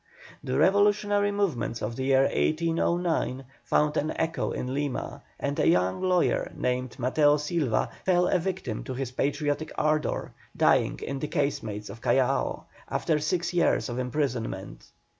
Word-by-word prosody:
The - - -1
revolutionary 205 +1 +3
movements 165 - -1
of 110 +2 -3
the 130 - -3
year 135 0 +4
1809 165 -3 0 0.2
found 150 0 +2
an 155 - 0
echo 165 0 -1
in 125 +1 -3
Lima, 145 -2 -3 0.2
and 140 +1 -2
a - - +3
young 90 +1 +2
lawyer 185 -1 +1
named 125 0 -2
Mateo 145 +4 +3
Silva 150 -6 0 0.2
fell 180 -1 +3
a 185 - +2
victim 175 - -3
to 130 -1 -5
his 130 -1 -3
patriotic 145 +3 -1
ardour, 155 0 0 0.2
dying - - +3
in 135 0 -4
the 150 - -3
casemates 110 -9 -2
of 115 +3 -11
Callao, - - +1 0.3
after 155 -2 0
six 170 +4 -1
years 175 -5 +2
of 120 +1 -3
imprisonment. 125 -6 -3
145 Hz, 145 wpm, -27 LUFS, 125-170 Hz, 0.3 s, year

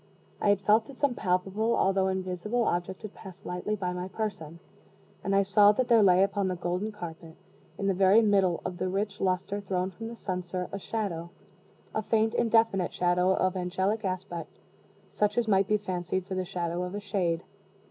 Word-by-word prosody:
I 205 - +3
had 200 -1 +3
felt 215 +3 +3
that 275 - -12
some 285 -3 +1
palpable 195 +3 0
although 190 0 +2
invisible 190 +5 -1
object 175 -1 -2
had 215 - -7
passed 190 -2 -12
lightly 180 +4 -2
by 180 -3 -3
my 180 +1 -4
person; 190 -6 -5 0.7
and 195 - 0
I 200 - +5
saw 205 +1 +6
that 250 +3 -1
there 230 -2 +6
lay 185 -1 +6
upon 200 0 0
the 185 - -1
golden 180 +4 -2
carpet, 165 -5 -9 0.4
in 200 - -3
the 195 - +3
very 195 +4 +5
middle 195 -5 +3
of 180 -1 -4
the 185 - -1
rich 200 +2 -2
luster 190 +2 0
thrown 185 -1 -2
from 225 +5 -7
the 235 - -7
censer, 180 -2 -3
a 200 - -4
shadow 190 -6 -3 0.6
a 215 - 0
faint, 220 +1 +1
indefinite 225 -5 +2
shadow 180 +1 +2
of 185 0 +1
angelic 190 +4 -1
aspect 185 -2 -4 0.5
such 210 +1 0
as 240 -2 +2
might 195 -2 +3
be 210 -1 +3
fancied 185 -2 -3
for 190 - -6
the 185 0 -1
shadow 175 -2 -3
of 180 +2 -4
a - - -2
shade. 185 -5 -1
190 Hz, 190 wpm, -28 LUFS, 180-210 Hz, 0.7 s, saw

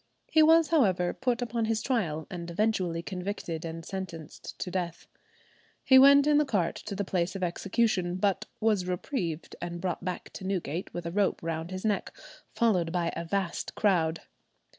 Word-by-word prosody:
He 315 - +6
was, 325 +1 +6
however, 190 - +3
put 250 -1 -1
upon 230 -1 -1
his 220 0 0
trial, 165 - -1
and 170 -2 -6
eventually 180 -3 0
convicted 180 -3 -4
and 165 0 -6
sentenced 170 -5 -7
to 180 - -4
death. 175 -2 -3 0.8
He 260 -1 +7
went 280 +1 +8
in 300 0 +5
the - - +4
cart 200 - 0
to 200 - -3
the 200 +1 -2
place 185 +1 -1
of 190 - -3
execution, 185 0 0
but 195 0 0
was 210 -5 +1
reprieved 180 - -3
and 175 0 -4
brought 180 -1 -3
back 180 -1 -4
to - - -8
Newgate 180 -3 -3
with 175 -1 -6
a 170 - -3
rope 200 -1 +1
round 165 0 -3
his 185 +2 -5
neck, 210 -2 -1 0.3
followed 185 -9 +2
by 170 -1 -1
a 170 - -3
"vast" 175 0 -2
crowd. 165 -6 +2
185 Hz, 175 wpm, -29 LUFS, 170-220 Hz, 0.8 s, went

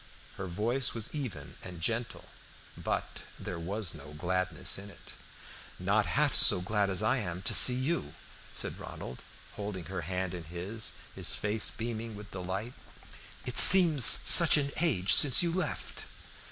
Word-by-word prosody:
Her 95 - -7
voice 115 +9 -2
was 115 -1 -4
even 120 - -8
and 90 -2 -10
gentle, 115 +7 -4 0.5
but - - -6 0.2
there 90 - -8
was 95 +2 -5
no 75 -2 -13
gladness 90 +2 -3
in 100 +1 -11
it. - - -15 0.6
"Not 100 +2 -1
half 80 - 0
so - - +5
glad 100 +2 -2
as 95 +2 -2
I 110 +5 0
am 90 -5 -6
to - - 0
see 125 - +6
you," 130 - -4 0.4
said - - -6
Ronald, 60 - -10 0.4
holding 100 -4 -7
her 90 -1 -7
hand 90 +2 -5
in 85 -2 -9
his, 95 +6 -5 0.2
his - - -7
face 105 +1 -2
beaming 115 -1 -7
with 105 0 -13
delight. 95 +6 -7 0.7
"It 125 - +3
seems 170 -8 +9
such 165 +6 +6
an 140 -1 -2
age 115 - +1
since 145 +3 +7
you 170 -1 -2
left!" 175 -5 -6
100 Hz, 155 wpm, -28 LUFS, 90-120 Hz, 0.7 s, seems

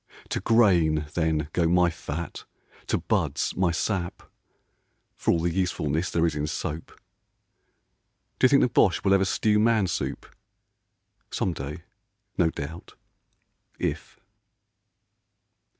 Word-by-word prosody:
To - - -1
grain, 85 -10 +3
then, 80 -3 0
go 85 -2 +2
my 90 0 +3
fat, 80 +1 -6 0.4
to - - +1
buds - - -1
my 95 -1 +2
sap, 85 +1 -2 0.9
For - - -3
all 85 - +4
the 85 0 -1
usefulness 85 -3 -1
there 85 0 +1
is 80 - +1
in 75 0 -2
soap. 75 0 -5 1.4
D'you 130 - +5
think 140 - +5
the - - +4
Boche 95 -7 +2
will 95 - +4
ever 95 0 +4
stew 105 +2 +2
man 110 -2 +3
soup? - - -3 1.0
Some 90 - -1
day, 75 +3 -7 0.5
no 85 -2 +3
doubt, 80 +1 -8 0.8
if 75 -3 -4
85 Hz, 120 wpm, -26 LUFS, 80-95 Hz, 1.4 s, D'you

